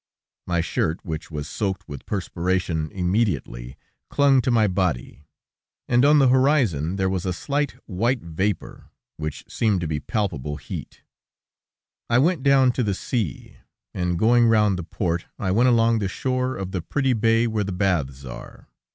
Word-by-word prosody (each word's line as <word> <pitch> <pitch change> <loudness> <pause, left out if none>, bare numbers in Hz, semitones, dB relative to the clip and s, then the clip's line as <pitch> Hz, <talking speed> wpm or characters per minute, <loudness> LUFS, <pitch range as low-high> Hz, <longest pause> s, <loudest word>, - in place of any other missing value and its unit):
My 85 -1 +1
shirt, 80 0 -2
which 80 -2 -5
was 75 -2 -5
soaked 95 +5 -3
with 70 -2 -9
perspiration 90 -4 -1
immediately, 90 - -1 0.3
clung 140 -2 +4
to 125 - -1
my 115 -3 +4
body, 90 -7 -2 0.6
and 125 +1 +3
on 150 +2 +6
the 135 -3 +5
horizon 125 - +2
there 95 -1 0
was 95 -2 -1
a 95 - -1
slight, 140 +9 -1
white 115 +6 -1
vapor, 85 +4 -3 0.3
which 75 -1 -5
seemed 105 -5 +1
to 85 - -2
be 75 -1 -2
palpable 75 - -2
heat. - - -8 1.1
I 120 - +4
went 160 +3 +2
down 135 -2 +5
to 125 - -1
the 100 -3 0
sea, 105 - -4 0.4
and 90 -1 -1
going 120 +4 +4
round 105 -4 +3
the - - -4
port, 85 0 -2
I 95 - -1
went 120 +6 +4
along 115 -1 +3
the 100 - -1
shore 130 +5 -1
of 95 -1 -5
the 95 - -2
pretty 135 - 0
bay 115 0 +3
where 110 -2 0
the 100 - -4
baths 80 -9 -1
are. - - -10
95 Hz, 165 wpm, -23 LUFS, 85-120 Hz, 1.1 s, on